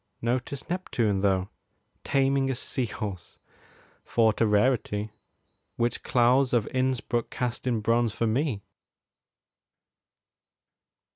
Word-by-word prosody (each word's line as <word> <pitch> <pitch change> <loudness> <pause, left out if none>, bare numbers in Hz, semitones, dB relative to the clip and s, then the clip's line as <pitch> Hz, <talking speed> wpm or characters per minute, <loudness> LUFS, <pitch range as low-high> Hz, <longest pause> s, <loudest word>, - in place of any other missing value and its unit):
Notice 125 +3 -2
Neptune, 120 - 0
though, 95 -1 +1 0.5
Taming 135 0 +2
a 130 - 0
sea 125 0 -2
horse, 100 -5 -6 0.7
thought 110 -2 +2
a 115 - +5
rarity, 105 -1 +1 0.6
Which 120 0 -1
Claus 125 +2 +3
of 115 -4 +2
Innsbruck 130 -2 0
cast 125 0 -3
in 115 -3 +1
bronze 115 +1 +2
for 115 - -1
me! 115 -2 0
120 Hz, 100 wpm, -27 LUFS, 105-130 Hz, 0.7 s, a